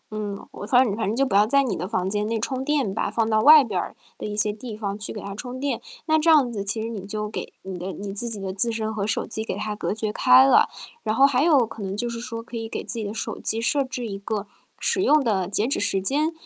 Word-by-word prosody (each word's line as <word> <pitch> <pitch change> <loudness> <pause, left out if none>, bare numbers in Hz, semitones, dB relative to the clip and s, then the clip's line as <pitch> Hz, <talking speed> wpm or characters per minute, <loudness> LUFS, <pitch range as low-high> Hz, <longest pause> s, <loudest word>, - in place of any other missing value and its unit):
嗯， 205 -2 -5
我 205 - -8
反 250 +3 +5
正 205 -4 -1
反 225 -2 -2
正 215 - 0
就 275 +3 +2
不 260 - -3
要 205 +2 +5
在 275 +3 +4
你 235 -8 -1
的 180 +2 -4
房 190 -3 -1
间 210 +1 -1
内 225 0 -1
充 260 +3 -2
电 275 -8 0
吧， - - -1
放 225 -1 0
到 215 - +4
外 300 +3 +9
边 205 -7 -3 0.2
的 - - -4
一 210 0 -5
些 210 0 +1
地 215 0 -8
方 200 -2 -3
去 205 - -5
给 210 - -6
它 200 - -6
充 245 +5 -7
电。 275 -3 -2 0.2
那 315 0 +3
这 320 +2 +2
样 290 -6 +5
子， 200 -3 -3
其 200 +3 -2
实 - - -3
你 205 -4 -6
就 210 +1 -3
给 210 - -6
你 190 -1 -6
的 185 +2 -4
你 200 -1 -6
自 235 +4 -4
己 215 -3 -5
的 190 -1 -4
自 230 +5 +1
身 220 -1 -2
和 205 -2 -2
手 225 - -1
机 220 -1 -5
给 220 - -4
它 210 0 -3
隔 - - -3
绝 215 0 -2
开 130 -6 +7
了。 135 - +5 0.3
然 215 0 -1
后 270 - +6
还 275 -1 +3
有 295 -7 +5
可 225 0 -10
能 195 0 -4
就 240 - -1
是 235 -1 -4
说， 230 -1 -6
可 230 +1 -11
以 225 0 -5
给 - - -4
自 230 - -5
己 215 - -3
的 200 - -4
手 220 0 -5
机 225 - -2
设 275 +5 +1
置 250 -2 -5
一 195 -2 -5
个 205 0 -3 0.3
使 375 - +1
用 305 -5 +4
的 195 -7 0
截 205 +3 0
止 270 - 0
时 195 -1 +1
间。 290 - 0
220 Hz, 315 characters per minute, -24 LUFS, 205-250 Hz, 0.3 s, 外